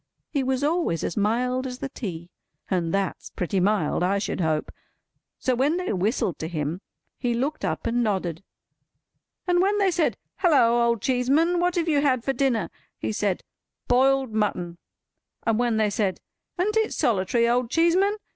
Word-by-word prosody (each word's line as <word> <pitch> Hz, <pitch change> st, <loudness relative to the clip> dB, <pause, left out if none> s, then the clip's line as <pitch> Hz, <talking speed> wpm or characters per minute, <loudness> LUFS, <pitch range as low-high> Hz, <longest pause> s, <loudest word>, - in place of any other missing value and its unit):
He 280 Hz, -, 0 dB
was 265 Hz, +1 st, -1 dB
always 295 Hz, -, 0 dB
as -, -, -2 dB
mild 250 Hz, +5 st, 0 dB
as 250 Hz, -1 st, -6 dB
the 270 Hz, -, -5 dB
tea—and 175 Hz, -4 st, -5 dB
that's 195 Hz, -1 st, -2 dB
pretty 185 Hz, +2 st, -2 dB
mild, 190 Hz, -5 st, +1 dB
I 190 Hz, +3 st, +2 dB
should 200 Hz, -2 st, -2 dB
hope!—so 160 Hz, +9 st, -4 dB
when 280 Hz, +7 st, +1 dB
they 365 Hz, -10 st, -2 dB
whistled 200 Hz, -, 0 dB
to 160 Hz, -, -3 dB
him, 160 Hz, +2 st, -3 dB, 0.4 s
he 240 Hz, -1 st, 0 dB
looked 280 Hz, +6 st, -2 dB
up -, -, -2 dB
and 240 Hz, +1 st, +1 dB
nodded; 185 Hz, -5 st, -2 dB, 1.0 s
and 355 Hz, -1 st, +3 dB
when 400 Hz, +2 st, +2 dB
they 390 Hz, -2 st, +3 dB
said, 340 Hz, -2 st, +1 dB, 0.2 s
"Halloa, 240 Hz, -10 st, +4 dB
Old 235 Hz, -3 st, 0 dB
Cheeseman, 280 Hz, +8 st, +2 dB
what 355 Hz, 0 st, +1 dB
have 345 Hz, -1 st, 0 dB
you 295 Hz, -3 st, +3 dB
had 260 Hz, -5 st, +2 dB
for 270 Hz, -, 0 dB
dinner?" 240 Hz, -9 st, 0 dB, 0.3 s
he -, -, -3 dB
said, 205 Hz, -3 st, -1 dB, 0.4 s
"Boiled 265 Hz, -1 st, +3 dB
mutton;" 180 Hz, -5 st, -1 dB, 0.7 s
and 225 Hz, -1 st, +2 dB
when 240 Hz, -2 st, +1 dB
they 215 Hz, -1 st, +2 dB
said, 200 Hz, -4 st, -1 dB, 0.4 s
"An't 420 Hz, +5 st, +1 dB
it 440 Hz, 0 st, +1 dB
solitary, 230 Hz, +2 st, +2 dB
Old 240 Hz, 0 st, +1 dB
Cheeseman?" 345 Hz, -, +3 dB
240 Hz, 165 wpm, -25 LUFS, 195-285 Hz, 1.0 s, Halloa